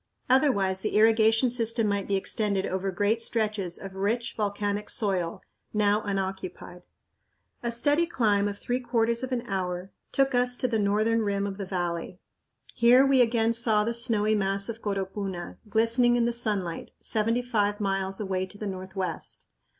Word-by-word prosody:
Otherwise 200 -9 +3
the - - -2
irrigation 225 +2 +4
system 230 -1 +1
might 200 -1 -1
be 200 - +1
extended 200 0 0
over 190 +1 -2
great 205 +5 0
stretches 215 -6 -1
of 195 -1 -9
rich, 210 +5 -1
volcanic 205 0 -2
soil, 185 -6 -2 0.3
now 210 0 +3
unoccupied. 190 -3 -4 0.8
A 235 - -2
steady 290 +8 +2
climb 210 -9 +2
of 205 0 -4
three 245 +4 -2
quarters 235 -1 0
of 260 0 -4
an 245 -2 -1
hour 185 -3 -3 0.2
took 270 0 +2
us 245 0 +1
to 255 - 0
the 225 -3 0
northern 215 +3 +2
rim 200 -1 0
of 195 -1 -4
the 195 - -4
valley. 175 -1 -3 0.6
Here 245 +3 +6
we 270 -2 +4
again 230 -1 +2
saw 225 -2 +2
the 230 +2 -1
snowy 225 -3 +1
mass 195 0 0
of 230 0 -6
Coropuna, 195 -2 -4
glistening 230 +3 +3
in 240 -1 +2
the 235 - 0
sunlight, 205 -8 -1
seventy 230 +3 0
five 205 -3 0
miles 195 -1 -1
away 190 -2 -2
to 205 - -12
the 210 - -6
northwest. 190 -1 -5
210 Hz, 165 wpm, -27 LUFS, 195-235 Hz, 0.8 s, Here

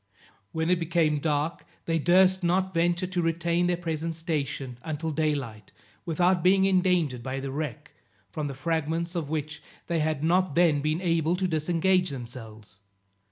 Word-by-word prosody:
When 160 +2 0
it 180 - +3
became 165 -3 +1
dark 150 +1 -1 0.2
they 165 -1 0
durst 185 +3 +4
not 185 +2 +1
venture 175 +1 +1
to 180 -1 -2
retain 170 +1 +1
their 175 -1 +1
present 165 -1 -3
station 140 -6 -3
until 160 +2 -3
day 155 0 +1
light 115 -6 -7 0.4
without 175 +2 +2
being 190 +2 +4
endangered 180 -9 +2
by 130 +2 -4
the 135 0 -5
wreck, 150 +1 -5 0.4
from 150 -2 -3
the 140 - -6
fragments 165 +3 -2
of 165 -5 -3
which 150 -1 -3 0.2
they 170 -2 -1
had 155 -1 -1
not 175 -1 +2
then 165 -5 +4
been 155 +3 -1
able 165 -1 +1
to 185 0 0
disengage 175 +3 +1
themselves. 115 -6 -9
165 Hz, 160 wpm, -27 LUFS, 150-175 Hz, 0.4 s, durst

